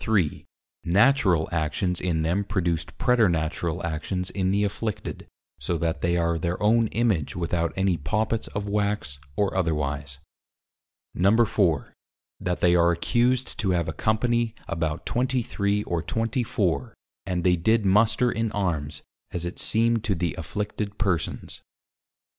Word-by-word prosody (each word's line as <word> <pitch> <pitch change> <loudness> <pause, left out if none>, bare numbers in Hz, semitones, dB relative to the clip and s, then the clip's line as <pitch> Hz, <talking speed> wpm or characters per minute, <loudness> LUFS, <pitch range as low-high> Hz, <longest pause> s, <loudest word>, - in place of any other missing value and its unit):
Natural 95 - +3
Actions 85 +3 -1
in 80 -3 0
them 90 +5 +1
produced 85 -5 -2
Preternatural 85 - +1
actions 90 +3 -3
in 95 -2 0
the 100 +2 +2
Afflicted, 105 +1 -4 0.3
so 85 - -1
that 80 0 -1
they 85 +1 +1
are 85 -1 +1
their 85 +2 -2
own 115 +2 +3
Image 105 -10 0
without 85 -1 -1
any 95 -2 +1
Poppits 110 +9 -1
of 100 0 -4
Wax 100 -8 -1 0.2
or 100 -2 0
otherwise. 75 -6 -1 1.0
4. 100 -5 +2 0.5
That 90 -1 -2
they 90 0 +5
are 85 0 +5
accused 120 +8 +1
to 100 - 0
have 85 - -1
a 80 - -3
Company 115 +5 0
about 80 -2 -2
23 115 -5 0
or 85 -4 -2
24 115 - -1 0.3
and 90 -2 -1
they 90 0 +4
did 110 +5 +2
Muster 110 +5 +3
in 115 -1 -1
Armes, 80 -7 -2 0.3
as 85 -1 -4
it 85 - -5
seemed 115 0 +2
to 100 -3 +1
the 85 0 -1
Afflicted 105 +4 -4
Persons. 95 -6 -1
5. - - -25
95 Hz, 135 wpm, -25 LUFS, 85-110 Hz, 1.0 s, they